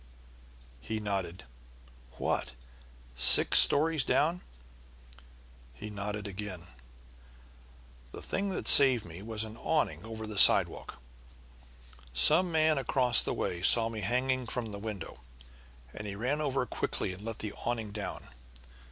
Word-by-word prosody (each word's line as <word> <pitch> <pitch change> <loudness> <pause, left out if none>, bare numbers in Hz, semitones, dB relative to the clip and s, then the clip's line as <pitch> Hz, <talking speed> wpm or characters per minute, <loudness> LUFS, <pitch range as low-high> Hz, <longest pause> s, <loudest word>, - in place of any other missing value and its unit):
He 110 - -6
nodded. 95 -4 -5 0.7
"What, - - -3 0.6
six 60 0 +6
stories 155 0 +3
down?" 160 +7 0 1.3
He 105 - -9
nodded 105 0 -6
again. 95 -3 -7 1.5
"The - - -10
thing 200 +1 -3
that 190 - -5
saved 130 -5 +6
me 85 +2 -11
was 110 0 -4
an 110 0 -10
awning 155 +3 -2
over 110 0 -8
the 105 -2 -2
sidewalk. - - +4 1.2
Some 170 - +4
man 155 -2 +1
across 125 -3 +3
the - - -4
way 85 - -4
saw 115 +4 +6
me 110 -2 -7
hanging 125 +4 -2
from 115 -2 -5
the 100 - -8
window, 100 -9 -8 0.7
and 105 - -8
he 100 - -7
ran 130 +8 -3
over 135 -3 -2
quickly 95 - -3
and 95 +3 -12
let 115 -1 -6
the 105 -2 -6
awning 115 -3 -4
down. 105 -1 -8
110 Hz, 130 wpm, -29 LUFS, 100-130 Hz, 1.5 s, six